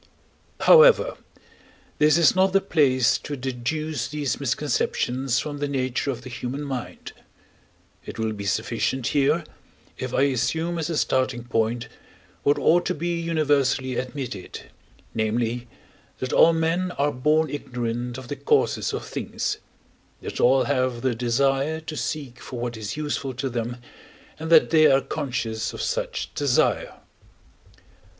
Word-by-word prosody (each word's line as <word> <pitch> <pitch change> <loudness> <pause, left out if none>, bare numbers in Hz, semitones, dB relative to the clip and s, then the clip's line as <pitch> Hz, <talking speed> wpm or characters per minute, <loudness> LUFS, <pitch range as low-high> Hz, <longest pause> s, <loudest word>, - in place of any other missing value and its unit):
However, - - +7 0.8
this 150 +1 +5
is 170 0 +5
not 190 0 +3
the 195 - +5
place 130 -8 +2
to 145 - -6
deduce 130 +1 -3
these 145 -1 -2
misconceptions 130 -1 0
from 145 -1 -5
the 145 - -1
nature 130 -1 -1
of 125 -2 -4
the 130 - -8
human 125 +4 -4
mind: 135 -4 -6 0.9
it - - -8
will 110 -1 -1
be 100 -1 -6
sufficient 130 +6 -1
here, 145 +4 +2 0.6
if - - -4
I 135 - +2
assume 155 +6 0
as 160 - -2
a 165 - -1
starting 130 -3 0
point, 120 0 -1 0.5
what 145 - +2
ought 175 +2 +3
to - - -1
be 170 +2 -2
universally 145 -5 +1
admitted, 125 -5 -6 0.4
namely, 115 +2 -1 0.5
that 130 - -4
all 165 - +7
men 165 +3 0
are 145 +1 +1
born 150 +3 +1
ignorant 120 -3 -4
of 130 -1 -9
the 145 - -4
causes 140 +1 +1
of - - -4
things, - - -3 0.6
that - - -6
all 130 +2 +5
have 130 -4 0
the 130 -2 +2
desire 135 +6 +1
to 160 -1 -7
seek 140 -6 -4
for 125 - -7
what 120 0 -3
is 110 +3 -5
useful 145 -3 -3
to 135 +2 -2
them, 120 0 -3 0.6
and 160 +1 -5
that 160 -1 +6
they 155 -1 +6
are 135 0 +4
conscious 120 -8 -3
of - - -6
such - - -3
desire. - - +1
135 Hz, 145 wpm, -24 LUFS, 125-155 Hz, 0.9 s, However